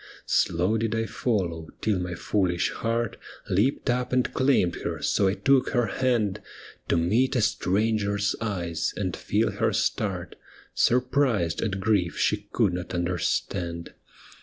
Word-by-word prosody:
Slow 90 +7 +1
did 115 0 -1
I 115 0 0
follow, 90 -10 -2
till 105 -4 0
my 90 -1 -3
foolish 90 -1 0
heart 115 0 -2 0.3
Leaped 115 +12 +1
up 125 0 -1
and 125 -1 +1
claimed 130 -10 +2
her, - - -4
so 100 - +2
I 95 - +1
took 135 +1 +3
her 120 -2 +3
hand, 120 -6 0 0.5
To - - +2
meet 115 - +2
a 120 - +3
stranger's 105 0 +1
eyes, 85 -7 -2
and 95 -4 -2
feel - - 0
her - - 0
start, - - -1 0.4
Surprised 125 - +2
at 95 -4 -1
grief 95 -4 +1
she - - 0
could 90 - +2
not 90 0 -4
understand. 85 0 -2
100 Hz, 140 wpm, -26 LUFS, 90-115 Hz, 0.5 s, took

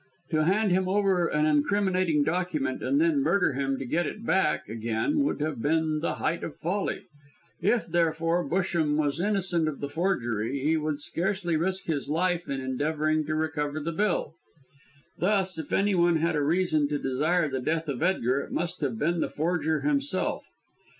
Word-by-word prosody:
To 155 -1 +2
hand 200 +3 +2
him 185 +1 +2
over 190 -3 +2
an 150 -1 +1
incriminating 180 +1 +2
document 160 -4 -1
and 280 - +1
then 320 -3 +3
murder 200 - +2
him 135 0 -1
to 135 - -5
get 170 +7 0
it 225 - -7
back 190 -4 +1
again 115 - -1
would 285 - 0
have 150 -6 -2
been 155 +1 +1
the 165 - -1
height 170 - -2
of 160 - -5
folly. 190 +5 -2 0.6
If, 215 +6 +2
therefore, 165 0 +1
Busham 170 -4 +1
was 150 0 0
innocent 185 -4 +1
of 150 -3 -3
the 140 - -3
forgery, 140 - -1
he 155 +4 +1
would 155 -2 -2
scarcely 175 +2 -1
risk 185 +4 -1
his 145 -4 -2
life 175 +2 0
in 135 - -2
endeavouring 155 +3 0
to 155 - -1
recover 155 -1 -1
the 160 +3 -3
bill. 175 -4 0 0.9
Thus, 190 -2 +1
if 155 - -7
anyone 180 -4 +3
had 165 +1 +1
a 150 - +1
reason 155 -1 +2
to 145 0 -1
desire 155 +6 +1
the 135 -2 -3
death 160 +4 -1
of 135 -4 -3
Edgar, 140 -8 +1
it - - -9
must 175 -1 -2
have 130 -6 -1
been 170 +6 0
the - - 0
forger 160 -1 0
himself. 285 -1 0
160 Hz, 175 wpm, -27 LUFS, 150-185 Hz, 0.9 s, then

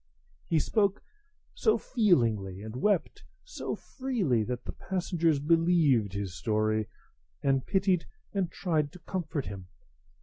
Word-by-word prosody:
He 165 - +2
spoke 200 +5 +1 0.5
so 440 - +3
feelingly, 115 - +1
and 110 +1 -7
wept 195 +7 0 0.2
so - - -4
freely, 210 - -1
that 125 +1 -4
the - - -4
passengers 170 -4 0
believed 150 - +3
his 100 -3 -3
story, 110 +4 0 0.6
and 135 -1 +2
pitied 190 -3 +2 0.3
and 195 -4 0
tried 155 -6 0
to 180 - -11
comfort 160 -6 -3
him. 95 -3 -7
155 Hz, 125 wpm, -29 LUFS, -, 0.6 s, so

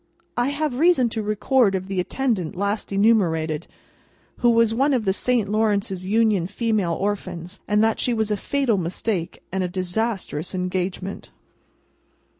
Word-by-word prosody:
I 240 +1 +1
have 285 -3 -2
reason 320 -7 +4
to 220 0 -2
record 215 +1 +2
of 185 0 -3
the 195 -1 -2
attendant 200 - -1
last 200 +3 -2
enumerated, 175 -7 +2 0.7
who 240 - +3
was 230 -1 +4
one 270 +4 +2
of 230 -4 -1
the 190 - +2
Saint 240 0 +1
Lawrence's 205 -3 0
Union 210 -4 +2
Female 205 -4 0
Orphans, 185 -1 -4
that 215 +1 +2
she 250 - +1
was 220 -2 0
a - - +2
fatal 270 -2 0
mistake 180 +1 -3
and 190 0 -1
a - - 0
disastrous 185 -2 -2
engagement. 185 +1 -3
205 Hz, 145 wpm, -23 LUFS, 185-230 Hz, 0.7 s, reason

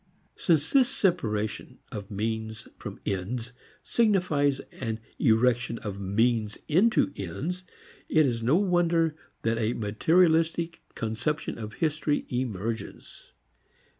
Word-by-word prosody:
Since 160 -4 +2
this 265 -2 +5
separation 110 - -1
of 100 -2 -6
means 110 +1 -3
from - - -7
ends 115 +6 -3 0.3
signifies 175 - +2 0.2
an 115 -3 -2 0.2
erection 115 +1 +3
of 100 -3 -6
means 110 +2 +1
into 180 -2 +3
ends, 150 - -4 0.5
it 155 -1 +5
is 120 -3 0
no 125 +7 +3
wonder 170 -4 +2 0.3
that 115 0 +1
a 115 +1 +1
"materialistic 165 - +2
conception 115 +6 -2
of 110 -1 -6
history" 155 -2 0
emerges. 115 -3 -4
125 Hz, 105 wpm, -28 LUFS, 110-165 Hz, 0.5 s, this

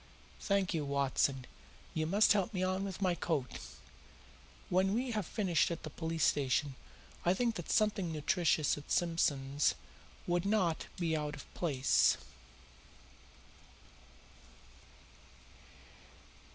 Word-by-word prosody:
Thank 195 -2 0
you, 160 -3 -1
Watson, 140 -2 0 0.5
you 155 -1 -1
must 205 +6 +5
help 205 +1 -1
me 185 - 0
on 185 +1 0
with 195 0 -4
my 185 -2 +3
coat. 155 -7 -2 1.1
When 190 +2 +2
we 250 +1 -1
have 210 -6 -2
finished 185 -8 +1
at 170 -1 -5
the 155 - -6
police 160 0 -2
station 140 0 +1 0.5
I 175 +2 +3
think 235 +2 +1
that 175 -6 -7
something 205 -5 +1
nutritious 155 -1 +1
at 145 - -15
Simpson's 145 -5 +1 0.5
would 175 0 0
not 195 -5 +1
be 165 -2 0
out 150 -1 -3
of 145 - -13
place." 135 -6 +2
170 Hz, 115 wpm, -33 LUFS, 150-190 Hz, 1.1 s, must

